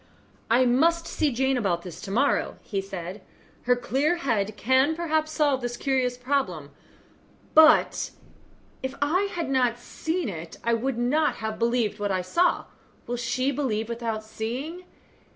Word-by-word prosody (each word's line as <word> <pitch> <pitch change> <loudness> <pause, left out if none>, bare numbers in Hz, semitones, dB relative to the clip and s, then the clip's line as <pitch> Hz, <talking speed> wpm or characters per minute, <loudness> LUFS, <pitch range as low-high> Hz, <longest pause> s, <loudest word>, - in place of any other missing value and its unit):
"I 245 +3 +5
must 330 +7 +3
see 305 -3 0
Jane 265 +2 +1
about 180 -7 0
this 180 -1 -9
to 195 - -7
morrow," 260 +8 +1 0.2
said 190 -1 -6
he; - - -20 0.5
"her 250 - +5
clear 270 +7 +1
head 215 - -1
can 260 +7 +3
perhaps 315 -2 0
solve 290 -4 +2
this 240 0 -3
curious 255 -2 0
problem; 250 - -1 0.8
but 315 0 +6 0.7
if 265 +1 -4
I 360 +8 +1
had 340 -2 -3
not 250 -3 +2
seen 320 +7 -3
it, 165 -4 -7
I 235 - +2
would 240 +2 -1
not 295 +6 +2
have 220 0 -4
believed 230 -3 +1
what 205 -1 -1
I 185 -1 0
saw. 345 - +2 0.4
Will 245 - -3
she 255 +3 0
believe 230 -6 -1
without 230 -2 -3
seeing? 255 +11 -5
250 Hz, 150 wpm, -26 LUFS, 220-290 Hz, 0.8 s, but